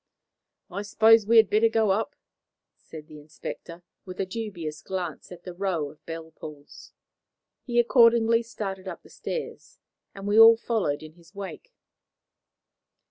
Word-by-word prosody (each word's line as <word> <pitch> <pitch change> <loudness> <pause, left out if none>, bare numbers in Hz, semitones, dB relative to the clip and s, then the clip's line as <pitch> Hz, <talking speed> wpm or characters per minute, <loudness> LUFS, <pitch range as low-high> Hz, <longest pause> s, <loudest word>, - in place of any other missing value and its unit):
"I 195 +3 -4
suppose 220 +1 +4
we 230 +1 +5
had 220 -2 +7
better 215 +3 +3
go 220 -2 +2
up," 205 +3 -1 0.6
said 155 -2 -12
the 155 -1 -13
inspector, 165 +3 -9 0.2
with 185 -1 -10
a 195 - 0
dubious 185 -7 -6
glance 180 -2 -6
at 175 -1 -11
the 180 - -8
row 175 -6 -2
of 155 - -23
bell 165 0 -7
pulls. 150 -2 -12 0.7
He 240 -1 +1
accordingly 230 -1 +4
started 195 -4 -6
up - - -8
the - - -18
stairs, - - -7 0.4
and 195 0 -7
we 210 +2 +3
all 225 0 +9
followed 205 -12 -2
in 155 0 -11
his 170 +3 -22
wake. 200 - -8
195 Hz, 150 wpm, -26 LUFS, 165-225 Hz, 0.7 s, all